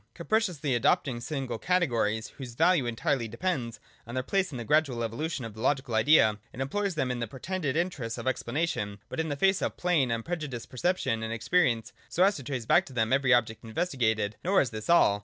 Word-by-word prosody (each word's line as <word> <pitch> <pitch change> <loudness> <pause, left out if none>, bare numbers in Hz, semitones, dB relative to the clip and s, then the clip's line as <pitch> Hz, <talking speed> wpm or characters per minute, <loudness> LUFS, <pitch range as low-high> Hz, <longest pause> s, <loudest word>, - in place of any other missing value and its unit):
Capriciously 175 - 0
adopting 120 +1 +1
single 135 -4 -4
categories, 120 - +1
whose 125 -3 -7
value 165 -3 +3
entirely 120 +1 -1
depends 120 - -3 0.3
on 120 - -7
their 130 - -1
place 190 +5 0
in 130 - -5
the 120 - -4
gradual 130 -2 +2
evolution 130 +4 -3
of 115 - -7
the 110 - -10
logical 130 -1 0
idea, 110 -2 +5
it - - -10
employs 190 +8 -1
them 130 -4 0
in 125 - -3
the 120 - -2
pretended 155 - -3
interests 160 -10 -2
of - - -6
explanation, 130 -5 -1
but - - -5
in 160 0 -1
the 145 - -1
face 190 +6 +2
of - - -2
plain, 170 -8 +2
unprejudiced 130 +1 -4
percep 175 +9 +1
tion 115 -9 -1
and 110 0 -3
experience, 115 0 +1 0.2
so 180 - +2
as 200 +1 +4
to 140 - -7
trace 125 -2 -4
back - - +5
to 135 - -11
them 110 0 +1
every 135 -1 +3
object 115 -2 +2
investigated. 110 - -1
Nor 190 +3 +4
is 125 - -2
this 110 +4 -7
all. 105 -12 +5
130 Hz, 210 wpm, -28 LUFS, 115-165 Hz, 0.3 s, idea